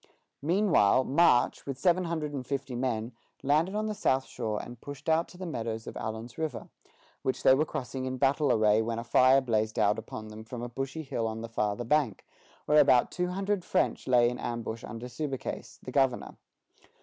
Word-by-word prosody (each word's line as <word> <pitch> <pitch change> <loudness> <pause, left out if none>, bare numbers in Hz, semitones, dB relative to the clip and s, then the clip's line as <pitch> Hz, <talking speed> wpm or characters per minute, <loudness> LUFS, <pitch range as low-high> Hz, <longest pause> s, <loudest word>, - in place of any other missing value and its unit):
Meanwhile, 165 - +3
March, 135 -4 +3
with 135 -2 -3
seven 180 +5 +2
hundred 160 -3 -3
and 135 -3 -3
fifty 135 0 -4
men, 120 -2 -2 0.3
landed 155 +8 +2
on 215 0 0
the 215 - -2
south 135 -10 +1
shore 110 -4 -3
and 120 -1 -9
pushed 145 +1 -9
on 160 +1 +3
to 180 - -14
the 185 - -6
meadows 115 -8 -4
of - - -8
Allen's 110 +3 -6
River, 155 -6 -4 0.5
which 130 - -2
they - - +7
were 150 +4 +2
crossing 130 +1 -4
in 130 0 -3
battle 140 +1 +2
array 110 -1 +4
when 115 0 -2
a 115 - -3
fire 130 +3 +5
blazed 110 -3 0
out 105 0 +3
upon 110 -1 -8
them 110 +1 -9
from 120 +1 -7
a 120 - -4
bushy 135 +5 -4
hill 115 -5 -2
on 110 0 -4
the 115 - -5
farther 105 +1 -1
bank, 135 -5 +1 0.4
where 150 0 +5
about 130 -4 +4
two 180 0 -1
hundred 195 +1 -1
French - - 0
lay 120 -2 +5
in 125 +1 -3
ambush 115 -1 -4
under 115 +2 -7
Subercase, 135 +2 -5
the 125 - -7
governor. 135 -2 +1
130 Hz, 195 wpm, -29 LUFS, 115-150 Hz, 0.5 s, they